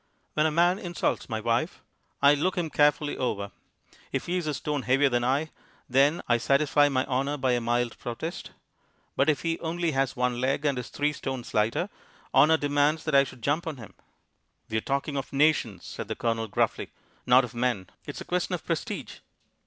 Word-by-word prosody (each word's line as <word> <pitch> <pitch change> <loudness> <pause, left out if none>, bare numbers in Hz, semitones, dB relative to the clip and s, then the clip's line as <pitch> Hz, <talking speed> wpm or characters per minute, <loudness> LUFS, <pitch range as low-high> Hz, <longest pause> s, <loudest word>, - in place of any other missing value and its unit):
When 155 +1 +3
a - - 0
man 175 +4 +3
insults 175 -5 -2
my 110 -2 -2
wife, 115 - -1 0.4
I 140 +1 +8
look 175 +6 0
him 165 -3 -1
carefully 150 0 +2
over; 100 -5 -2 0.6
if - - -2
he 175 - -2
is 175 -3 -3
a 150 - -1
stone 145 0 -2
heavier 135 +2 +3
than 120 -1 0
I, 140 +5 0 0.4
then 140 +6 +3
I 120 - +4
satisfy 145 +3 +3
my 130 -2 0
honour 135 +2 -1
by 130 -2 +1
a 120 -1 +1
mild 120 0 -1
protest. 125 +8 -5 0.7
But 140 - +3
if 150 - +1
he 165 0 -1
only 170 0 -1
has 135 -2 0
one 125 -1 0
leg, 135 +3 0
and 140 -3 +1
is 125 - -7
three 145 +1 0
stone 135 -4 -4
lighter, 110 - +1 0.5
honour 155 +4 +6
demands 145 +1 +1
that 155 - -3
I 140 0 +7
should 130 -3 -11
jump 150 +6 0
on 155 -4 -4
him." 115 -5 -11 0.8
"We're 110 0 0
talking 140 +3 -2
of 135 - -4
nations," 135 - +1
said - - -6
the - - -3
Colonel 115 -1 -1
gruffly, 105 - -1 0.4
"not 125 +2 +6
of 125 -1 -6
men, 120 -6 -1 0.2
It's - - -6
a - - -7
question - - -1
of - - -9
prestige." - - -4
140 Hz, 195 wpm, -27 LUFS, 125-150 Hz, 0.8 s, I